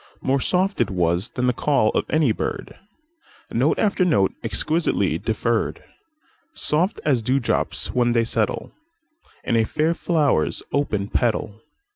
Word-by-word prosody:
More 135 +1 +1
soft 190 +7 0
it - - +1
was 90 +1 0
than 125 0 0
call 125 -4 +2
of - - -1
any 155 -6 +3
bird, - - -4 0.8
Note - - +2
after 200 -3 +2
note, 100 - +2
exquisitely 155 - 0
deferr'd, - - -1 0.7
Soft 175 +8 0
as 135 -6 +2
dew 130 +5 +1
drops 120 - -1
when 120 -1 +2
they 115 -1 +3
settleIn 115 -2 -1 0.7
a 115 -1 +2
fair 155 +8 0
flower's 150 - 0
open 105 -9 -1
petal. 110 -2 -1
125 Hz, 130 wpm, -22 LUFS, 110-155 Hz, 0.8 s, any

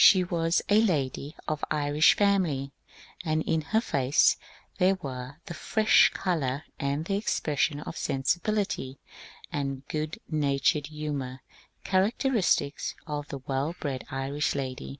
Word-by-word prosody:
She 185 -2 +8
was 170 -1 +1
a 210 +2 +5
lady 145 - -1
of 155 -1 -2
Irish 150 0 +4
family, 175 -10 +1 0.5
and 155 -2 0
in 160 - +1
her 220 +9 +1
face 140 - +3 0.4
there 185 +2 +4
were 130 -3 -6
the 175 - -6
fresh 215 +6 +4
colour 150 -7 -1 0.2
and 140 +3 -1
the 195 +2 0
expression 150 -7 0
of - - -7
sensibility 165 -1 -1 0.5
and 135 -1 -3
good 155 +1 -3
natured 145 -1 +1
humour 145 -4 -5 0.4
characteristic 195 - +1 0.3
of 150 -2 -4
the 140 - -6
well 140 +5 -1
bred 135 -3 -3
Irish 135 +3 -1
lady. 130 -2 -4
150 Hz, 130 wpm, -28 LUFS, 140-175 Hz, 0.5 s, She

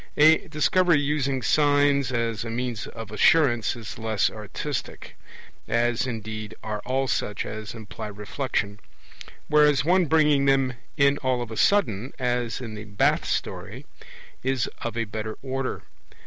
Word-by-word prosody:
A 160 +5 +6
Discovery 165 +1 +3
using 140 -3 0
signs 145 +2 +3
as 115 -2 -1
a 115 - -5
means 120 -1 -3
of 115 -2 -9
assurance 120 -1 +3
is 115 -1 -8
less 110 -3 +1
artistic, 105 -2 -6 0.5
as 120 +2 +1
indeed 110 -2 -5
are 105 -1 -3
all 135 +1 0
such 105 -5 -2
as 110 +1 -6
imply 110 -1 -7
reflection; 105 0 -3 0.7
whereas 150 -3 +4
one 180 +2 +4
bringing 150 -2 +3
them 135 -1 +3 0.2
in 140 0 +4
all 130 -2 0
of 115 - -10
a - - -5
sudden, 130 - +2
as 125 -2 -1
in 115 -3 -6
the 105 0 -7
Bath 100 -1 +1
story, - - -4 0.6
is 130 -2 0
of 120 0 -4
a 115 - +1
better 110 0 -5
order. 135 -1 -3
125 Hz, 145 wpm, -25 LUFS, 110-140 Hz, 0.7 s, A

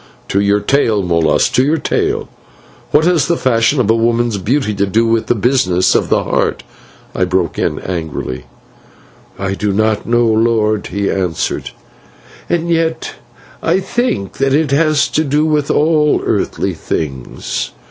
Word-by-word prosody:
"To 100 - +1
your 100 +1 +2
tale, 110 -3 +1
Molas, 85 -3 +2
to 130 - +2
your 150 +4 +1
tale. - - -1 0.6
What 150 +2 +3
has 170 -5 +2
the 170 -1 +1
fashion 120 +2 +2
of 125 - +2
a - - +3
woman's 115 -1 +1
beauty 120 +2 0
to 100 0 0
do 115 +4 +2
with 115 -1 0
the 120 - +2
business 100 -6 +2
of - - +1
the - - +2
Heart?" - - -1 0.5
I 95 - 0
broke 90 -2 -1
in, 75 - -1
angrily. 80 -7 -5 0.9
"I 95 0 -2
do 105 +1 -1
not 110 +1 0
know, 120 0 +2
lord," 110 -1 +1
he 100 +1 -2
answered; 90 -4 -2 0.8
"and 170 0 0
yet 165 -1 -1 0.5
I - - +1
think 195 - -2
that 135 0 +2
it 150 -2 +1
has 150 -1 +2
to 155 - 0
do 150 +1 +1
with 150 -2 0
all 150 -1 +2
earthly - - -1
things." 70 -6 -4
115 Hz, 160 wpm, -15 LUFS, 100-145 Hz, 0.9 s, What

